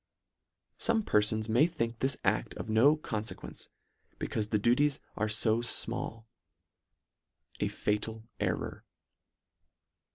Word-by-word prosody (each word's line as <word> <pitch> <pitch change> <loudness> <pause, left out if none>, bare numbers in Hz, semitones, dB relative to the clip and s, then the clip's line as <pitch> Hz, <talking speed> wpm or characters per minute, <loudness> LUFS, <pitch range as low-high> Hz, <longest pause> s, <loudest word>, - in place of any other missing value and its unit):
Some 230 -2 +2
perfons 110 - +2
may 120 +8 +4
think 115 -9 -3
this 135 0 +1
acT: - - +1
of - - -6
no 130 +8 +6
con 110 -8 -3
fequence, 110 - -6 0.5
becaufe 105 -1 -2
the 110 - +2
duties 135 +7 +3 0.2
are 110 0 0
fo 110 +1 +3
J 120 - -1 0.2
mall. 115 0 -5 1.3
A - - +1
fatal 110 +1 -2 0.2
error. - - -2
115 Hz, 120 wpm, -31 LUFS, 110-135 Hz, 1.3 s, no